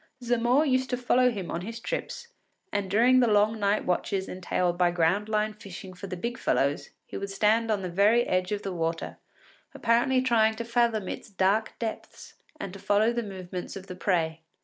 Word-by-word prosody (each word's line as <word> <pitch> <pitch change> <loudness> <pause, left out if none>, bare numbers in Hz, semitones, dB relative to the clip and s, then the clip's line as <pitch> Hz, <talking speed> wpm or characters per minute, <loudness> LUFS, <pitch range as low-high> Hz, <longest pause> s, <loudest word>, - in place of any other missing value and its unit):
Zamore 245 +4 +2
used 260 -2 +1
to 250 - 0
accompany 250 0 +3
him 200 -7 -5
on 170 - -3
his 225 +5 -6
trips, 475 - -5 0.4
and 200 -2 -1
during 240 +6 +5
the 245 - +4
long 215 +1 +3
night 205 +1 +1
watches 190 +2 -1
entailed 180 -1 -1
by 175 0 +3
ground 175 +5 +1
line 215 0 0
fishing 195 -2 -10
for 190 +2 -8
the 185 -1 -5
big 235 +6 -4
fellows, 140 +3 0 0.2
he - - -7
would 200 - -4
stand 220 +3 +2
on 205 -3 0
the - - -2
very 210 +6 +4
edge 185 -3 -1
of 205 0 -2
the 195 - -3
water, 165 -1 -3 0.6
apparently 240 +3 +2
trying 220 -3 +3
to 235 +1 -5
fathom 230 -4 +1
its - - -6
dark 200 +3 +1
depths 225 -2 -6 0.3
and 195 - -6
to 195 - -9
follow 205 +3 +2
the 240 - -1
movements 185 -4 -7
of 190 -1 -8
the 185 - -8
prey. 165 -4 0
210 Hz, 195 wpm, -27 LUFS, 185-230 Hz, 0.6 s, during